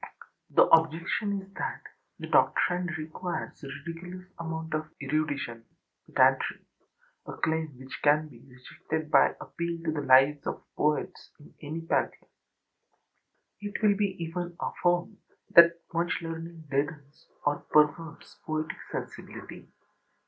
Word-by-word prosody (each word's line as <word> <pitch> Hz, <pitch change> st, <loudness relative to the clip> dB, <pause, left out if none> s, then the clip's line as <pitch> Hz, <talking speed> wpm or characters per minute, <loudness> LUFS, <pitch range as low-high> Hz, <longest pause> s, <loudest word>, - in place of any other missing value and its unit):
The -, -, +6 dB
objection 170 Hz, +5 st, +2 dB
is 195 Hz, +1 st, -18 dB
that -, -, -4 dB, 0.3 s
the -, -, -6 dB
doctrine 180 Hz, 0 st, +3 dB
requires 160 Hz, +2 st, -5 dB
a -, -, -6 dB, 0.2 s
ridiculous 180 Hz, +2 st, -7 dB
amount 160 Hz, -1 st, -4 dB
of 155 Hz, 0 st, -1 dB
erudition 140 Hz, -5 st, -2 dB, 0.4 s
(pedantry), -, -, +3 dB, 0.6 s
a -, -, -5 dB
claim 160 Hz, -3 st, -1 dB
which 130 Hz, +1 st, -9 dB
can 150 Hz, +1 st, +4 dB
be 125 Hz, -6 st, -15 dB
rejected 140 Hz, +5 st, -6 dB
by -, -, +5 dB
appeal 170 Hz, 0 st, -4 dB
to 160 Hz, -, 0 dB
the 150 Hz, -2 st, -2 dB
lives 135 Hz, +2 st, +5 dB
of -, -, -4 dB
poets 150 Hz, 0 st, -1 dB
in 145 Hz, -, -16 dB
any 155 Hz, +2 st, -5 dB
pantheon. 165 Hz, -, -1 dB, 1.3 s
It 205 Hz, 0 st, -4 dB
will 210 Hz, -, +6 dB
even 180 Hz, -4 st, -1 dB
be 175 Hz, -, -19 dB
affirmed 175 Hz, +3 st, 0 dB, 0.3 s
that 170 Hz, 0 st, +8 dB
much 165 Hz, 0 st, +1 dB
learning 165 Hz, 0 st, -6 dB
deadens 145 Hz, +1 st, -3 dB, 0.2 s
or 145 Hz, 0 st, +2 dB
perverts 155 Hz, +2 st, +1 dB
poetic 155 Hz, 0 st, -3 dB
sensibility. -, -, -7 dB
160 Hz, 125 wpm, -29 LUFS, 150-170 Hz, 1.3 s, that